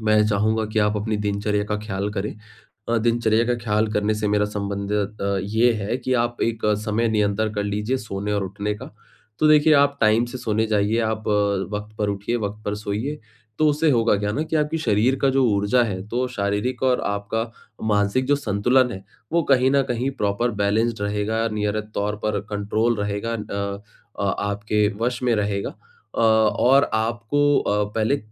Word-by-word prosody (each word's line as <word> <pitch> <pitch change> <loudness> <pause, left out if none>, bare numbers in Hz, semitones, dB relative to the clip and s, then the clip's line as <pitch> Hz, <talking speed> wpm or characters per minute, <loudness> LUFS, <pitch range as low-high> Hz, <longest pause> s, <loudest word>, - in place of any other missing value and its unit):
मैं 110 -1 +3
चाहूँगा 110 +1 +1
कि 110 +1 -2
आप 105 0 +2
अपनी 105 +1 -1
दिनचर्या 105 0 -1
का 105 0 -2
ख्याल 100 -1 -3
करें। 105 0 -3 0.6
अ, 115 - +2
दिनचर्या 115 0 +2
का 125 - +1
ख्याल 110 -1 +1
करने 105 +1 +1
से 105 0 -1
मेरा 105 0 +2
संबंध 100 -1 -4 0.3
त 100 -1 0
ये 110 +4 +3
है 105 +5 -1
कि 130 +1 -2
आप 120 -1 0
एक 115 -2 -1 0.2
समय 110 +2 +1
नियंत्रण 105 0 0
कर 105 - -1
लीजिए 105 +5 -1
सोने 105 -2 -4
और 100 -1 0
उठने 100 +2 -3
का। 125 +5 -9 0.5
तो 155 - +4
देखिए 155 0 +6
आप 140 0 +4
टाइम 110 +2 +4
से 120 +2 -7
सोने 110 -2 0
जाइए, 105 +2 +1
आप 110 -1 -2
अ, 100 -2 +1
वक़्त 105 +1 -7
पर 105 -1 0
उठिए, 100 +4 -2
वक़्त 105 -1 -4
पर 105 - -1
सोइए। 105 +8 -3 0.4
तो 155 - +4
उससे 150 +2 +2
होगा 115 -3 +3
क्या 105 0 -1
ना, 150 +8 -1
कि 160 - -3
आपके 150 +1 +1
शरीर 120 -1 +2
का 135 - +4
जो 135 0 +2
ऊर्जा 100 +4 +2
है, 95 -4 -3
तो 125 +3 -1
शारीरिक 110 +3 -2
और 130 -1 +2
आपका 105 +3 -2 0.4
मानसिक 105 +4 +1
जो 145 - +3
संतुलन 125 +1 +2
है, 95 -2 -7 0.3
वो 170 -1 +2
कहीं 130 0 +5
न 140 0 +4
कहीं 125 +2 0
प्रॉपर 105 +4 +1
बैलेंस्ड 110 +2 +1
रहेगा, 105 +2 0
नियमित 105 0 -2
तौर 105 +1 -1
पर 105 -1 0
कंट्रोल 110 +3 0
रहेगा 105 +3 -2
अ 100 -2 -3 0.4
अ 100 - +1
आपके 105 +1 0 0.2
वश 125 +1 -1
में 120 - +2
रहेगा। 100 -1 -1 0.5
अ, - - 0
और 110 +5 +4
आपको 115 +5 -1 0.2
अ, 105 0 +1
पहले 110 +6 +2
110 Hz, 190 wpm, -23 LUFS, 105-120 Hz, 0.6 s, देखिए